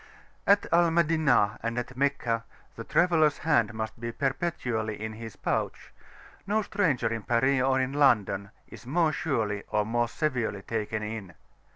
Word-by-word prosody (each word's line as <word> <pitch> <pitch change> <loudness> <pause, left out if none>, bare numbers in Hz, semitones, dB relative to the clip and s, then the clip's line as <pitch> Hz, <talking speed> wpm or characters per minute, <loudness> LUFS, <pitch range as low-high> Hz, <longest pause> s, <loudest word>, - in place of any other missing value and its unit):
At 200 0 +5
Al 170 0 +5
Madinah 155 -10 +2
and 115 +1 -3
at 125 +1 -4
Meccah 130 -4 0 0.3
the 115 - -6
traveller's 160 0 +3
hand 120 -9 +2
must 110 +1 -5
be 115 0 -4
perpetually 125 -6 -2
in 110 +1 -4
his 110 -1 -9
pouch: - - -3 0.5
no 215 +2 +1
stranger 150 - 0
in 115 - -3
Paris 130 +5 +2
or 130 0 +2
in 130 +1 -1
London 105 -8 +2 0.2
is 120 - -13
more 160 +3 +2
surely 115 -10 -1
or 105 -1 +1
more 120 +2 0
severely 125 -8 -2
taken 110 0 -3
in. 105 -5 -6
120 Hz, 155 wpm, -28 LUFS, 110-150 Hz, 0.5 s, At